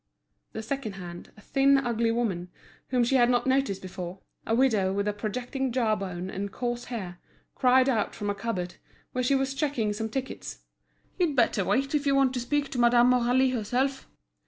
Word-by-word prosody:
The 220 - -5
second 255 -2 -3
hand, 175 -2 -9
a - - -14
thin, 275 +4 +3
ugly 235 -3 0
woman, 205 -7 -1 0.4
whom 250 -2 +2
she 265 +3 +3
had 240 -1 +4
not 245 -1 +2
noticed 265 -8 +1
before, 180 0 -6 0.3
a 225 - +2
widow 220 -7 +3
with 200 +1 -1
a 210 - +1
projecting 245 +5 -3
jaw 230 -3 +2
bone 185 -3 -5
and 195 +1 -4
coarse 240 +1 -3
hair, 185 -8 -6 0.3
cried 255 0 +4
out 225 -6 0
from 205 - -4
a - - -1
cupboard, 195 -4 -4 0.3
where 255 - -1
she 275 +3 +3
was 270 0 0
checking 270 -7 0
some 220 +1 -3
tickets: 265 +3 -5 0.6
"You'd 335 -5 +2
better 230 -5 +3
wait 260 - 0
if 290 -1 +1
you 275 - +3
want 270 -2 +3
to 250 - -1
speak 285 +3 -1
to 250 - -4
Madame 240 +1 +5
Aurélie 250 +1 +3
herself." 255 +4 -1
240 Hz, 190 wpm, -27 LUFS, 205-265 Hz, 0.6 s, Madame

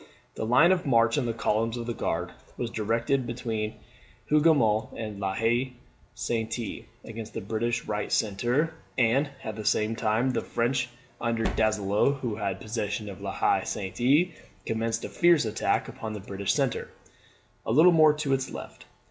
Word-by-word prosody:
The 110 - -4
line 150 +10 +6
of 185 -1 +2
march 115 -2 +4
of 140 - +1
the - - +1
columns 115 +1 0
of 120 - -4
the 120 - -2
Guard 90 -4 -2 0.3
was 120 -2 -3
directed 115 +4 0
between 110 -2 -3 0.6
Hougoumont 145 -9 +3
and 105 -3 -5
La 95 -1 -1
Haye 120 +4 +1 0.4
Sainte, 115 -1 -3 0.2
against 115 -1 -8
the - - -1
British 115 +4 -2
right 105 0 -3
centre; 120 +10 +1 0.2
and 130 +4 +3
at 110 - -4
the 110 - -6
same 110 +2 +1
time 115 +4 +1
the 120 - -1
French 120 +1 0 0.3
under 115 -1 0
Donzelot, 110 +5 +1
who 115 -5 -2
had 100 -3 -2
possession 105 -1 -3
of 95 - -9
La - - -3
Haye - - +2
Sainte, 130 - +1 0.3
commenced 115 0 -1
a - - -5
fierce 170 -6 +4
attack 110 0 0
upon 115 -4 -6
the 105 - -5
British 100 0 -2
centre, 135 -4 -1 0.7
a - - -2
little 160 +9 +7
more 155 -2 +6
to 150 -2 -1
its 135 0 0
left. - - -9
115 Hz, 165 wpm, -27 LUFS, 110-130 Hz, 0.7 s, little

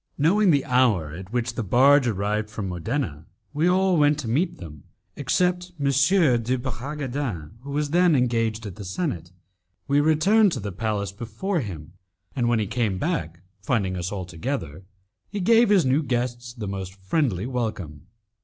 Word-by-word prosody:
Knowing 190 +7 +3
the 140 -5 +3
hour 115 - +2
at 95 +4 -9
which 120 -1 -1
the 120 - -3
barge 130 +6 +5
arrived 105 0 -1
from 105 -2 -5
Modena, 90 - -3 0.3
we 155 +4 +1
all 185 0 +3
went 145 -1 +4
to 145 -6 -5
meet 160 +10 0
them, 75 -5 -11 0.3
except 180 0 0
M. 140 - -2
de 135 - +3
Bragadin, 130 - -4
who 140 - -10
was 145 +1 -1
engaged 120 -10 +2
at 100 -1 -7
the 105 - -7
senate. 95 - -3 0.6
We 140 +1 +3
returned 180 +7 +4
to - - -3
the 100 -1 -5
palace 105 0 -2
before 120 - -3
him, 85 - -7 0.4
and 120 -3 +1
when 120 - +3
he 110 - 0
came 110 -2 -1
back, 150 - -3 0.2
finding 100 -3 0
us 90 +1 -3
all 95 -3 -4
together, 90 - -5 0.4
he 205 - -4
gave 230 +4 +4
his 195 -6 +4
new 130 +4 +3
guests 120 -2 -2
the 115 -4 -6
most 95 -1 -5
friendly 100 - -1
welcome. 105 - -4
120 Hz, 165 wpm, -24 LUFS, 100-145 Hz, 0.6 s, barge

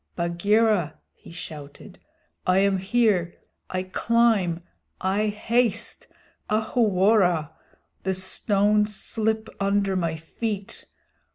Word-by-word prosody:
"Bagheera," 180 +1 +1 0.2
he - - -16
shouted, 150 -4 -10 0.5
"I 185 0 +4
am 195 0 +3
here. 195 -4 +1 0.3
I 185 0 -2
climb! 195 -4 +1 0.4
I 195 +3 0
haste! 225 +1 0 0.4
Ahuwora! 205 - +2 0.5
The 190 0 -1
stones 210 +2 +1
slip 220 +1 -1
under 200 -1 +1
my 165 -3 -1
feet! 200 +5 -5
200 Hz, 90 wpm, -25 LUFS, 180-215 Hz, 0.5 s, I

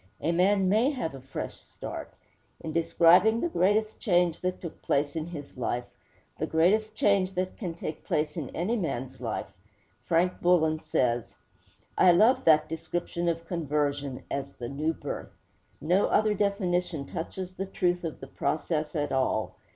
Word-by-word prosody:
A 165 - 0
man 190 +3 +3
may 220 +7 +4
have 250 - -3
a 135 - -9
fresh 135 +1 -6
start. - - -8 0.5
In 160 - -5
describing 175 +6 +5
the 345 - 0
greatest 215 - +1
change 175 -5 +2
that 185 0 -2
took 170 -3 -8
place 145 +1 0
in 160 0 -3
his 145 -6 -9
life 120 -1 -2 0.5
the - - -1
greatest 210 +7 +2
change 195 -3 +2
that 185 0 -2
can 175 -7 -5
take 155 -2 -6
place 150 0 -1
in 150 -6 -4
any 185 +8 0
man's 130 - -3
life 115 -3 -4 0.5
Frank 175 +2 +1
Bullen 160 -3 +3
says: 120 -5 0 0.6
'I 180 - +7
love 220 +9 +4
that 155 -1 +5
description 170 +2 -2
of 165 0 -3
conversion 145 -5 -2
as 140 0 -3
the 120 -1 -6
"new 150 +4 -1
birth." - - -6 0.5
No 180 +6 +2
other 215 0 +3
definition 180 -6 0
touches 180 +4 -5
the 190 +1 -4
truth 180 -2 0
of 165 -2 -5
the 135 - -7
process 155 +2 -2
at 145 -2 -1
all. 130 -4 0
170 Hz, 160 wpm, -28 LUFS, 150-185 Hz, 0.6 s, I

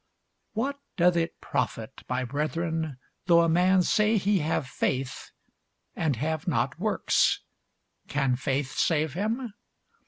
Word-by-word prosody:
What 275 +6 -2 0.2
doth 175 0 +4
it 165 -1 -1
profit, - - -3
my 125 0 0
brethren, 155 +2 -2 0.3
though 170 -1 +6
a 165 - +3
man 180 +3 +4
say 210 +4 +3
he 200 0 +2
hath 155 -2 0
faith, 130 -1 -2 0.7
and 150 -4 0
have 155 +6 -2
not 135 -1 0
works? 210 +1 +2 0.7
can 135 -3 +1
faith 135 +1 -1
save 155 -3 +1
him? 220 - -2
160 Hz, 125 wpm, -27 LUFS, 140-185 Hz, 0.7 s, though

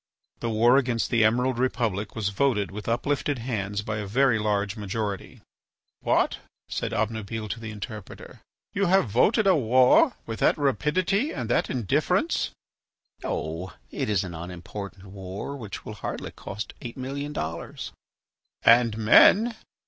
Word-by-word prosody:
The 115 - -2
war 115 +4 +5
against 120 -4 0
the 115 -3 +4
Emerald 120 +3 +2
Republic 115 -5 -1
was 110 -3 -1
voted 105 -2 +1
with 105 +2 -7
uplifted 140 +4 0
hands 105 -4 -3
by 105 0 -3
a 105 -1 -4
very 125 +2 +3
large 105 -1 0
majority. 105 -1 -4 0.6
"What?" - - +1 0.3
said - - -3
Obnubile 110 0 -2
to 115 - -4
the 110 -1 -6
interpreter; 105 -1 -9 0.3
"you 200 -1 +1
have 190 -5 +4
voted 210 - +3
a 190 -2 +5
war 130 - +5
with 115 -1 -5
that - - +3
rapidity 185 - +1
and - - -4
that - - +2
indifference!" 120 -7 +1 0.7
"Oh! 85 +3 -3 0.2
it - - -2
is 100 -2 +2
an 90 -2 -6
unimportant 90 +3 -8
war 95 +6 -6
which 110 -7 -8
will 110 - -6
hardly 105 - -5
cost 105 +4 -7
eight 120 +1 -7
million 140 +3 -4
dollars." 80 - -5 0.7
"And 115 -2 +5
men 195 - +6
110 Hz, 145 wpm, -26 LUFS, 100-130 Hz, 0.7 s, men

